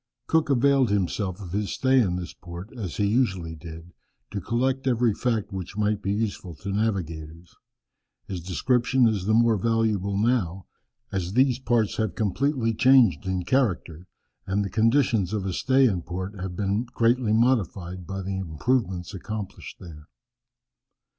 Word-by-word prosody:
Cook 160 -2 +2
availed 135 -1 +3
himself 100 -1 -1
of 90 -4 -8
his 105 +1 -2
stay 130 0 +3
in 95 -7 +2
this 90 -1 -5
port, 90 +7 -10
as 100 -9 -5
he 105 - +2
usually 100 -7 0
did, 80 +1 -10 0.4
to 100 - -3
collect 130 +6 -1
every 120 -3 +2
fact 110 -3 -1
which 95 +1 -6
might 105 0 +1
be 100 - -1
useful 100 -5 -3
to 100 +6 -6
navigators. 85 -6 -3 0.7
His 95 -3 -5
description 125 +7 +2
is 105 -4 -1
the 110 +1 +3
more 115 -1 +4
valuable 105 -2 0
now, 100 -5 0 0.5
as 95 -1 -2
these 130 0 +3
parts 120 -5 +1
have 110 -6 -1
completely 115 +3 0
changed 115 - +4
in 95 -2 -1
character, 90 - 0 0.4
and 100 +1 0
the 100 - -5
conditions 115 -3 +2
of 100 -3 -2
a 95 - -2
stay 135 +7 +3
in 95 -6 0
port 95 +3 -5
have 90 -1 -5
been 100 +5 0
greatly 120 -1 +1
modified 95 -7 0
by 95 +1 -4
the 95 0 -3
improvements 95 - -1
accomplished 105 +1 -6
there. 75 -4 -11
100 Hz, 155 wpm, -25 LUFS, 90-120 Hz, 0.7 s, more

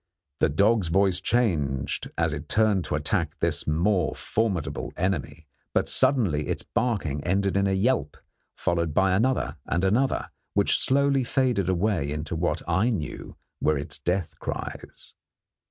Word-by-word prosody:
The - - +3
dog's 100 +5 +3
voice 95 +1 +2
changed 75 - 0
as 80 -2 +1
it 75 +1 -6
turned 105 -4 +2
to - - -2
attack 80 +1 0
this 80 -4 0
more 85 +1 +1
formidable 100 -8 -2
enemy, 85 -3 -2 0.3
but - - +2
suddenly 110 - +2
its - - -2
barking 90 - -1
ended 95 +2 +1
in 100 0 +2
a 95 - +1
yelp, 95 - 0 0.4
followed 85 -3 -1
by 95 -1 +3
another 125 +7 +1
and 85 +2 0
another, 115 +8 +1 0.2
which - - +3
slowly 140 0 +2
faded 120 -7 +1
away 90 -5 0
into 75 +2 -4
what 80 -1 -1
I 95 +8 +2
knew 95 -11 -4 0.3
were 75 -1 +2
its 75 +2 -3
death 90 +3 -2
cries. - - -7
90 Hz, 145 wpm, -26 LUFS, 75-110 Hz, 0.4 s, The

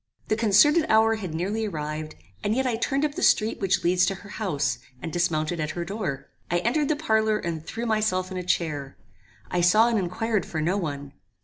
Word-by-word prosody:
The 215 - +3
concerted 235 - +4
hour 220 0 +4
had 185 -7 -5
nearly 205 +6 -1
arrived, 155 -3 -5 0.3
and 210 - +1
yet 265 +1 +1
I 245 -3 +1
turned 275 +5 0
up 295 - -2
the 360 - -5
street 215 +1 +3
which 195 -1 +1
leads 180 +1 +3
to 195 - 0
her 200 +1 -13
house, 165 -10 -1 0.2
and 165 - -6
dismounted 170 -1 0
at 155 +2 -3
her 170 - -2
door. 170 -10 -4 0.2
I 175 - +2
entered 260 - +1
the 310 - +2
parlour 220 -7 +1
and 165 -5 -4
threw 230 +7 -5
myself 215 -5 0
in 185 - -4
a - - -2
chair. 150 -6 -2 0.5
I 175 - +1
saw 215 +7 +5
and 230 -3 +1
inquired 205 +3 -1
for 160 - -5
no 170 +5 +1
one. 145 -7 -4
195 Hz, 210 wpm, -25 LUFS, 165-220 Hz, 0.5 s, saw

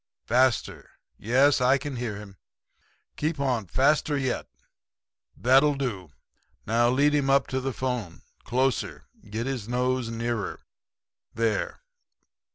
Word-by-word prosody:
Faster. 125 -3 +1 0.3
Yes, 130 +5 +3
I 130 +2 +4
can 140 -1 -5
hear 120 -3 -3
him. 100 -2 -11 0.8
Keep 150 0 -1
on 125 -7 0
faster 145 - +2
yet.... 130 -2 -2 0.9
That'll 135 +4 +4
do. 110 - -4 0.6
Now 120 +2 +3
lead 140 +4 +3
him 140 -2 +1
up 135 0 +4
to 130 - -1
the 135 +1 -2
phone. 125 -9 -4 0.2
Closer. 130 +1 -1 0.2
Get 110 +3 -3
his 125 -5 -4
nose 125 -1 0
nearer. 115 -3 -3 0.7
There. 115 - -1
125 Hz, 120 wpm, -26 LUFS, 115-135 Hz, 0.9 s, I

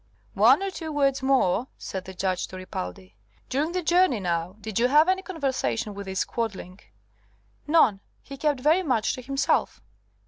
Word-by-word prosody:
"One - - +5
or 390 - -2
two 320 -4 -6
words 275 -2 +1
more," 260 -4 +2
said 190 -1 -6
the 190 - -9
Judge 185 0 -1
to - - -10
Ripaldi. 95 - -7 0.4
"During 290 +5 0
the 365 -1 -1
journey, 345 - +3
now, 175 0 -2
did 220 0 -3
you 245 - +4
have 300 +5 +5
any 375 +1 +2
conversation 270 - -2
with 200 0 -8
this 190 0 -1
Quadling?" 200 -5 -5 0.9
"None. 280 -10 +4 0.2
He 275 - -9
kept 285 -1 0
very 315 +7 +4
much 250 - 0
to 255 - -6
himself." 275 +3 0
255 Hz, 170 wpm, -25 LUFS, 190-300 Hz, 0.9 s, One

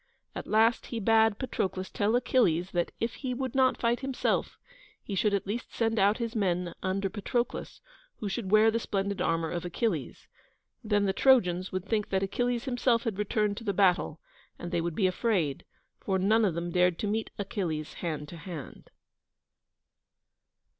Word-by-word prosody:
At - - -6
last 225 +2 +3
he 235 - -4
bade 220 0 +4
Patroclus 190 -7 -3
tell 210 +3 +1
Achilles 190 -8 +2
that, 175 -1 0
if 230 +1 -1
he 255 -3 -4
would 260 -1 -3
not 260 -1 +3
fight 235 0 +1
himself, 265 -1 -1 0.5
he 205 - -6
should 205 +2 +2
at 195 - -2
least 220 +5 -5
send 225 -1 +1
out 200 +2 +4
his 235 0 -4
men 180 -4 0
under 195 +1 -1
Patroclus, 235 +5 -3 0.4
who 210 - -4
should 200 0 -3
wear 215 +2 +6
the 230 - 0
splendid 200 -3 -2
armour 165 -2 0
of 175 - -3
Achilles. 175 - -2 0.6
Then 205 -2 +2
the 190 - +1
Trojans 185 -8 +3
would 185 -1 -3
think 215 -2 -1
that 190 0 +1
Achilles 245 +4 -1
himself 245 -2 +1
had 215 -4 -3
returned 210 0 0
to 230 - -7
the 200 -3 -1
battle, 185 -1 +2 0.4
and 175 - -6
they 170 -2 +1
would 170 -1 -3
be 195 - +2
afraid, 185 - 0 0.3
for 190 -1 -1
none 215 +4 +3
of 180 -5 0
them 170 +1 -3
dared 180 -1 +3
to - - -3
meet 215 +2 -1
Achilles 175 -7 -3
hand 155 -3 -3
to 170 - -9
hand. 165 -4 -9
205 Hz, 175 wpm, -29 LUFS, 180-230 Hz, 0.6 s, wear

